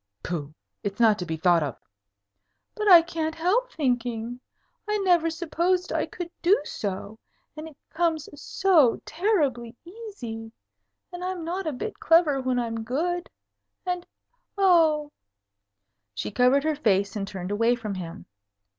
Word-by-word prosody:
"Pooh! 155 -4 -4 0.3
It's 200 +1 -4
not 220 -3 +5
to 180 - -4
be 160 -1 -3
thought 175 0 +4
of." 145 -4 -3 1.0
"But 425 -1 -3
I 350 -4 +9
can't 320 -2 -3
help 425 +10 +1
thinking. 245 -4 -2 0.5
I 420 - +2
never 350 -4 +3
supposed 345 +2 -1
I - - 0
could 350 -1 -7
do 380 +5 +4
so. 205 0 -5 0.4
And 310 +1 -7
it 305 -3 -14
comes 325 -2 0
so 310 -4 +3
terribly 290 - 0
easy. 335 - -8 0.6
And 355 0 -6
I'm 365 -2 -3
not 360 +2 -3
a - - 0
bit 250 - -6
clever 320 -4 +4
when 255 -1 0
I'm 230 -2 -2
good. 345 +9 -2 0.6
And 360 -1 -2 0.5
oh!" 320 -6 +4 1.0
She 105 - -4
covered 250 +5 +3
her 310 0 +1
face 200 -8 +1
and 200 -2 -3
turned 190 -1 -6
away 230 +4 +2
from 220 -4 -5
him. 165 - -7
295 Hz, 145 wpm, -26 LUFS, 225-350 Hz, 1.0 s, I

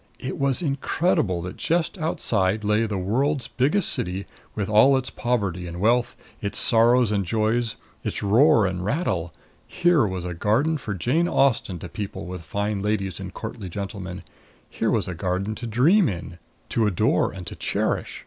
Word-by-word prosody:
It 130 - -5
was 140 +3 +1
incredible 140 - 0
that 90 - -7
just 170 +3 0
outside 105 - 0
lay 105 +2 +2
the 105 -2 -3
world's 125 +8 0
biggest 150 +10 +1
city, 95 +2 -2 0.3
with 100 -2 -2
all 110 +6 +5
its 130 -1 -3
poverty 100 -8 -1
and 85 +1 -7
wealth, 120 +4 +2 0.3
its 100 - -2
sorrows 120 0 +4
and 100 -2 +1
joys, 110 +4 0 0.3
its - - -3
roar 115 +3 +5
and 90 -1 -2
rattle. 95 - -1 0.4
Here 175 -9 +3
was 95 -2 -4
a 90 - -3
garden 125 - +1
for 105 -5 -4
Jane 140 - +1
Austen 125 - +2
to 85 - -7
people 100 +4 -6
with 90 -1 -6
fine 100 +4 -2
ladies 100 -2 -1
and 95 -1 -6
courtly 110 -2 -7
gentlemen 95 -1 -6 0.5
here - - -1
was - - +1
a 90 - -3
garden 95 +4 -2
to 120 +2 -6
dream 150 - +4
in, 85 -2 -7 0.3
to 115 -2 +1
adore 95 -5 +2
and 95 -2 -8
to - - -6
cherish. - - -2
105 Hz, 170 wpm, -24 LUFS, 95-125 Hz, 0.5 s, all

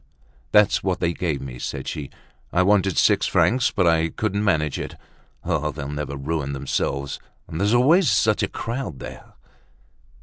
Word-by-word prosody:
"That's 105 -1 +4
what 95 -2 0
they 85 -1 0
gave 80 -5 -2
me," 60 -2 -7
said - - -5
she. 70 -3 -5 0.4
"I 90 - +3
wanted 95 -2 +2
six - - +4
francs, 125 0 +3
but 95 -5 0
I 80 -1 +3
couldn't 105 +1 -2
manage 75 -8 +1
it. - - -6 0.5
Oh! 75 - 0
they'll 70 -1 -6
never 75 -1 -4
ruin 70 0 -2
themselves. 70 0 -2 0.3
And 80 - -6
there's 105 +4 +3
always 155 +9 +5
such 110 -1 +2
a - - +1
crowd 115 - -5
there!" - - -10
85 Hz, 165 wpm, -23 LUFS, 70-105 Hz, 0.5 s, always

